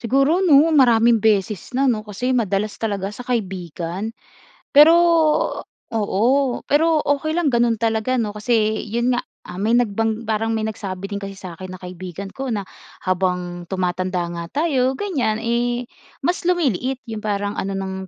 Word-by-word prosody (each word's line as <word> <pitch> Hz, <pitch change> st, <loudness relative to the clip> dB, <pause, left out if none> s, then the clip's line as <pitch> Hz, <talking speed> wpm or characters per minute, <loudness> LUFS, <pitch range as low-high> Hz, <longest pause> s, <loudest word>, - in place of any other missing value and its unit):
Siguro 275 Hz, +10 st, +2 dB
‘no, 290 Hz, -6 st, +7 dB, 0.2 s
maraming 235 Hz, -3 st, +5 dB
beses 210 Hz, 0 st, +1 dB
na 270 Hz, +2 st, +2 dB
‘no, 215 Hz, -4 st, 0 dB
kasi 245 Hz, +5 st, -1 dB
madalas 210 Hz, -2 st, 0 dB
talaga 200 Hz, -3 st, -2 dB
sa 215 Hz, +4 st, -9 dB
kaibigan. 190 Hz, -3 st, -3 dB, 0.6 s
Pero 300 Hz, +3 st, +9 dB, 1.0 s
oo, 205 Hz, -2 st, 0 dB, 0.5 s
pero 295 Hz, +3 st, +4 dB, 0.3 s
okey 310 Hz, +2 st, -3 dB
lang 325 Hz, -6 st, +1 dB
gano’n 235 Hz, -1 st, +3 dB
talaga 225 Hz, +2 st, 0 dB
‘no, 220 Hz, -4 st, -1 dB
kasi 215 Hz, 0 st, +1 dB
‘yon 235 Hz, +2 st, +1 dB
nga, 245 Hz, -, +1 dB, 0.3 s
ah, 180 Hz, -, -8 dB
may 225 Hz, +4 st, +2 dB
nagbang 225 Hz, -1 st, 0 dB
parang 225 Hz, +1 st, 0 dB
may 220 Hz, -, -1 dB
nagsabi 195 Hz, -3 st, -5 dB
din 200 Hz, -, -3 dB
kasi 195 Hz, -1 st, -7 dB
sa 185 Hz, -2 st, -8 dB
akin 185 Hz, +2 st, -9 dB
na -, -, -19 dB
kaibigan 185 Hz, +2 st, -7 dB
ko 270 Hz, 0 st, -5 dB
na 210 Hz, -5 st, -2 dB, 0.4 s
habang 180 Hz, -1 st, -1 dB
tumatanda 185 Hz, -1 st, -1 dB
nga 170 Hz, 0 st, -5 dB, 0.2 s
tayo 265 Hz, -4 st, +1 dB
ganiyan, 275 Hz, -, -1 dB
eh, 240 Hz, +1 st, 0 dB, 0.4 s
mas 355 Hz, -, 0 dB
lumiliit 270 Hz, -, +1 dB
‘yong 220 Hz, -2 st, -5 dB
parang 205 Hz, -1 st, -1 dB
ano 195 Hz, -1 st, -3 dB
ng, 190 Hz, 0 st, -4 dB
220 Hz, 160 wpm, -21 LUFS, 195-245 Hz, 1.0 s, Pero